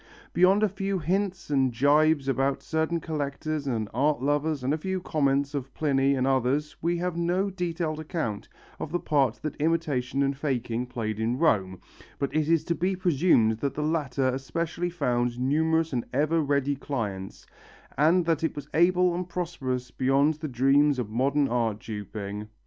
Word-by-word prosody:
Beyond 185 +4 +4
a - - +5
few 195 0 -2
hints 185 0 -2
and 135 -2 +2
gibes 145 +3 +3
about 135 0 0
certain 160 +1 -1
collectors 150 -1 -3
and 115 -5 -1
art 145 +4 +2
lovers 145 +1 0
and 135 +3 +1
a - - 0
few 190 +3 -2
comments 140 -4 0
of 135 -2 -4
Pliny 140 -2 +2
and 130 -1 0
others 135 +3 +1
we 170 +1 0
have 175 0 -2
no 180 +4 0
detailed 170 -4 -2
account 155 -10 -4 0.3
of 155 - -5
the 175 - 0
part 135 -9 +1
that 155 -2 -3
imitation 145 -5 0
and 135 0 0
faking 125 -4 -2
played 110 -3 -4
in 115 +3 0
Rome, 95 - +1 0.4
but 140 - -3
it 155 0 +1
is 165 -2 +3
to 170 - -1
be 185 +3 0
presumed 145 -11 +3
that 140 +1 -2
the 150 - -2
latter 145 -4 0
especially 165 +6 -2
found 125 -7 -1
numerous 160 +4 +1
and 120 -2 0
ever 160 +2 +2
ready 140 -1 +1
clients, 105 -9 -5 0.5
and 165 +5 +3
that 165 -2 0
it 160 - -1
was 145 - -7
able 180 +2 +4
and 180 +1 -4
prosperous 135 -8 -3
beyond 135 +3 +2
the 155 +1 -6
dreams 135 +2 +3
of 115 -4 -3
modern 140 +4 +2
art 115 -3 0
duping. 105 -1 -6
145 Hz, 170 wpm, -27 LUFS, 130-165 Hz, 0.5 s, a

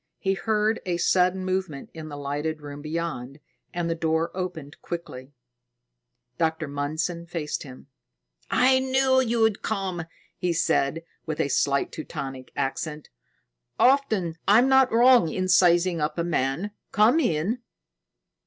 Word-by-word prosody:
He 195 - 0
heard 215 +3 0
a 180 -3 -1
sudden 185 +1 +2
movement 185 -6 -3
in 160 -1 -8
the 145 - -7
lighted 145 +2 -3
room 145 -1 -9
beyond, 150 -4 -4 0.3
and 175 -1 -2
the 165 - 0
door 160 0 0
opened 175 -6 -6
quickly. 140 -6 -7 1.1
Dr. 160 -1 0
Mundson 155 +4 -3
faced 160 -3 -3
him. 130 -2 -11 0.6
"I 260 +1 +4
knew 260 0 +3
you'd 225 -3 +1
come!" 190 -5 -3 0.3
he 180 -1 -1
said 165 0 +1 0.2
with 155 -1 -3
a 140 - +1
slight 140 +1 +1
Teutonic 135 -4 -7
accent. 150 +3 -3 0.7
"Often 220 -12 +2
I'm 225 +6 +6
not 265 -1 +5
wrong 240 -5 +5
in 185 +3 -2
sizing 175 -1 +4
up 150 +1 -1
my 170 - 0
man. 165 +4 -1 0.2
Come 225 +8 +4
in." 205 - 0
170 Hz, 135 wpm, -25 LUFS, 150-205 Hz, 1.1 s, I'm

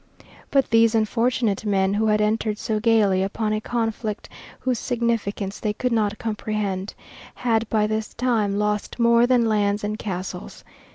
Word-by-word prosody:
But 275 -3 +2
these 225 0 +4
unfortunate 225 -1 +1
men, 195 -2 +1
who 220 +2 +1
had 210 0 +3
entered 215 0 0
so 215 -1 -2
gayly 210 -4 +3
upon 215 +2 -1
a 215 - -1
conflict 225 -2 -3 0.3
whose 250 -3 0
significance 225 -5 -2
they 210 -1 -1
could 250 +3 -2
not 210 -2 +1
comprehend, 210 -3 -3 0.4
had 225 -2 0
by 215 -1 +2
this 215 0 -3
time 225 -5 0
lost 210 0 -1
more 235 0 +4
than 245 -2 +3
lands 205 -2 +1
and 210 +1 -3
castles. 185 -1 -6
215 Hz, 155 wpm, -23 LUFS, 205-230 Hz, 0.4 s, these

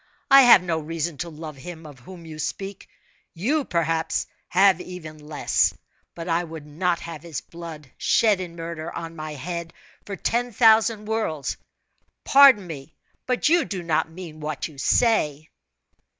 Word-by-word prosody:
I 275 0 +10
have 235 -8 +8
no 165 -3 -1
reason 160 0 -4
to 175 - -4
love 155 -2 -9
him 165 +3 -9
of 145 -4 -12
whom 170 +6 -12
you 155 -1 -9
speak 195 +5 -5 0.5
you, 275 - 0
perhaps, 165 - -1 0.2
have 190 -1 +4
even 160 -4 -9
less; 150 0 0 0.4
but 165 0 -7
I 170 0 +1
would 160 -3 -9
not 170 +3 -1
have 165 -3 -7
his 165 -4 -5
blood, 160 -5 -10
shed 215 -4 +3
in 175 -2 -6
murder, 165 -1 -6
on 165 0 -7
my 155 -1 -6
head, 170 +3 -6 0.3
for 200 - -4
ten 240 +4 -1
thousand 220 -1 +4
worlds! 210 -11 -2 0.7
Pardon 270 -8 +7
me, 155 -3 -9 0.3
but 250 +2 +1
you 335 +1 +4
do 190 -8 -5
not 160 -1 0
mean 165 -2 -10
what 150 -2 -4
you 150 -4 -14
say." 155 - +2
170 Hz, 160 wpm, -24 LUFS, 155-195 Hz, 0.7 s, I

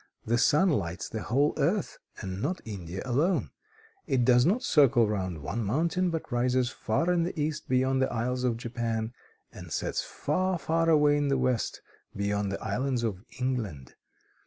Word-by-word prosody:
The 120 +2 +1
sun 155 +8 +4
lights 90 - -2
the 110 - -4
whole 140 +8 +2
earth, 175 +6 0 0.2
and 95 -2 -5
not 170 +8 -1
India 95 -4 -6
alone. 145 +9 +1 0.6
It 125 -2 +2
does 125 +1 +5
not 220 +8 +2
circle 130 -6 +4
round 95 -7 -3
one 115 +11 -2
mountain, 165 - +1
but 165 -2 -4
rises 125 0 +1
far 165 +11 0
in 175 - +2
the 170 0 -2
East, 150 0 -2
beyond 130 +1 +2
the 130 - +1
Isles 125 +2 -1
of 120 -3 +1
Japan, 115 -1 -3 0.4
and - - -10
sets - - -1
far, 185 0 -1
far 165 0 +1
away 150 -2 +5
in 145 -1 +1
the 135 -1 +2
West, 125 -3 -1 0.3
beyond 100 0 -1
the 100 - -4
islands 130 -2 -1
of 100 -4 -2 0.2
England. 110 - -3
125 Hz, 170 wpm, -28 LUFS, 110-150 Hz, 0.6 s, does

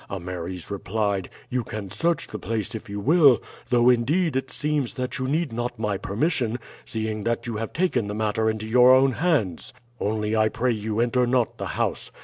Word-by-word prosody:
Ameres 90 -1 -5
replied, 100 -1 -1 0.2
'You 125 -1 0
can 105 -4 -6
search 170 -1 0
the 110 - -7
place 110 +1 -3
if 110 -2 -7
you 100 0 -4
will; 145 - +5 0.3
though, 120 0 +4
indeed, 140 +7 +3
it 130 0 -1
seems 150 -4 -1
that 125 -1 -3
you 130 - -1
need 155 -1 0
not 120 +1 -3
my 105 -2 -1
permission, 120 - 0 0.3
seeing 110 -1 -3
that 115 +1 -1
you 115 -3 -3
have 115 +1 -4
taken 165 - 0
the 105 - -4
matter 110 +1 +1
into 110 0 -3
your 125 +3 +7
own 135 +1 +4
hands. 130 - 0 0.3
Only 105 +1 -1
I 110 0 +3
pray 125 +1 0
you 110 -1 -2
enter 120 +1 +2
not 125 -1 +1
the - - -3
house. - - -1
115 Hz, 190 wpm, -25 LUFS, 105-130 Hz, 0.3 s, your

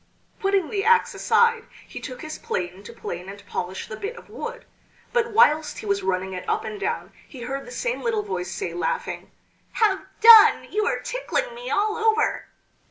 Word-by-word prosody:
Putting 390 -3 +1
the 400 -2 -1
axe 460 +1 +4
aside 465 -1 +2 0.2
he - - -8
took 255 -3 -8
his 310 0 -7
plane 180 +1 -4
to - - -8
plane 180 +2 -7
and 200 0 -11
polish 185 -1 -4
the 215 - -7
bit 420 - -5
of - - -14
wood; 485 +1 -7 0.5
but 475 -1 +2
whilst 315 -10 +3
he - - -8
was 200 -1 0
running 190 0 -2
it 180 - -5
up - - 0
and 215 -1 -6
down 470 - -3
he 260 - -11
heard 270 +3 -5
the - - -9
same 485 0 -2
little 450 -3 0
voice 180 - -4
say, 170 - -4
laughing: 170 -2 -3 0.4
"Have 425 -5 +2 0.2
done! 445 -1 +8
you 425 +2 0
are - - +1
tickling - - -2
me - - -7
all 425 +2 +1
over!" 445 0 +1
395 Hz, 190 wpm, -24 LUFS, -, 0.5 s, done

